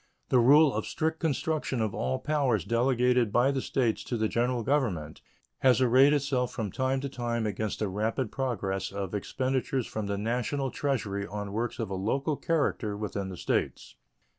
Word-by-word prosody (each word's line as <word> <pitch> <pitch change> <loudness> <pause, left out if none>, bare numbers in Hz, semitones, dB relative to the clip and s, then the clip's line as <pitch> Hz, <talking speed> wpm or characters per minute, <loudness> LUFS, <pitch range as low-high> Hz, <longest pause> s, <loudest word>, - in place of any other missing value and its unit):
The 130 - +4
rule 145 +4 +6
of 110 0 -2
strict 160 0 -1
construction 155 -3 -1
of 110 -2 -1
all 65 +1 -1
powers 145 -4 0
delegated 125 -1 +2
by 125 +5 +3
the 135 -1 -1
States 120 -5 0
to 120 - -2
the 110 0 +1
General 120 +1 0
Government 105 - -1 0.4
has 130 -1 +4
arrayed 130 +3 +5
itself 140 -4 0
from 110 -5 -4
time 130 +4 0
to 140 - -3
time 120 -3 -2
against 105 0 -2
the 105 - -1
rapid 110 +5 -2
progress 100 -8 -2
of 100 -1 -4
expenditures 130 +4 -1
from 110 -2 -4
the 100 0 -2
National 125 +5 -1
Treasury 105 -8 -2
on 105 0 -5
works 115 +3 -2
of 110 -4 -4
a - - -1
local 135 +11 -1
character 135 -10 -1
within 100 -2 -4
the 90 - -7
States. - - -2
120 Hz, 175 wpm, -28 LUFS, 105-135 Hz, 0.4 s, rule